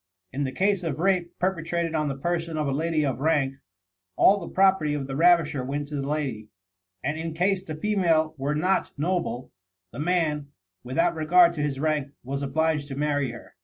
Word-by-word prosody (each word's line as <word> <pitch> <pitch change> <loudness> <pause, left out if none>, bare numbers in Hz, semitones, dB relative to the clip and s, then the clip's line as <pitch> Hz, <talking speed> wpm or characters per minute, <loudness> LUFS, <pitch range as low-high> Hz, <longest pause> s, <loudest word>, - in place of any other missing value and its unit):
In 140 +2 -1
the 130 - -3
case 195 +4 +1
of 160 -5 -3
a - - -2
rape 180 -3 +1
perpetrated 170 -2 -1
on 155 -1 0
the 135 -1 -3
person 165 +1 -2
of 150 -1 0
a - - 0
lady 155 +2 0
of 130 -3 -2
rank, 140 -3 +1 0.6
all 200 +1 +5
the 170 - -7
property 190 -6 +3
of 140 -2 -3
the 135 0 -5
ravisher 165 -4 +3
went 145 +2 -3
to 150 - -5
the 140 0 -3
lady; 135 -8 -3 0.5
and 150 +4 -2
in 165 -1 -4
case 185 +3 +1
the 160 -5 -7
female 165 -4 +1
were 140 +2 -1
not 180 +5 0
noble, 150 -6 -2 0.4
the - - -9
man, 155 -3 0 0.4
without 165 +8 +1
regard 170 +2 +5
to 155 - -4
his 145 -2 -2
rank, 150 -2 -1
was 140 +3 -4
obliged 150 +1 0
to 135 - -6
marry 145 -2 0
her. 120 0 -11
155 Hz, 200 wpm, -26 LUFS, 140-170 Hz, 0.6 s, all